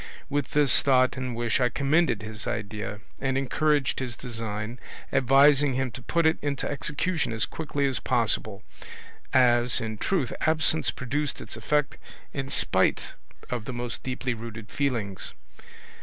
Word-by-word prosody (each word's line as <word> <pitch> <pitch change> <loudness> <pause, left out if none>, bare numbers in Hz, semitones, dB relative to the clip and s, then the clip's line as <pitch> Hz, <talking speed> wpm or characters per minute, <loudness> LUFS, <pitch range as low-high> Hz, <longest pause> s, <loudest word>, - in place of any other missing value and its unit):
With 145 -1 -1
this 145 -2 +5
thought 130 -2 +3
and 130 -2 -4
wish 120 -1 0
I 125 - +3
commended 140 -5 +1
his 110 -2 -5
idea 105 0 -4 0.2
and 135 -1 0
encouraged 145 +1 +1
his 125 -3 -4
design, 115 -1 -5 0.3
advising 135 +1 +5
him 130 -1 -1
to 130 - -8
put 170 +6 0
it 160 +1 +3
into 145 -2 -2
execution 150 +1 -1
as 110 -2 0
quickly 145 -3 -2
as 135 -2 0
possible, 110 -3 0 0.7
as, 120 -1 +4
in 110 -2 -4
truth, 170 -10 0
absence 155 0 +3
produced 140 +4 -2
its - - -8
effect 150 -2 0 0.3
in 135 -1 -3
spite - - +1 0.4
of 120 -3 -3
the 130 - -5
most 120 -1 -4
deeply 130 0 -2
rooted 110 -2 -8
feelings. 115 -9 -2
130 Hz, 145 wpm, -26 LUFS, 115-145 Hz, 0.7 s, this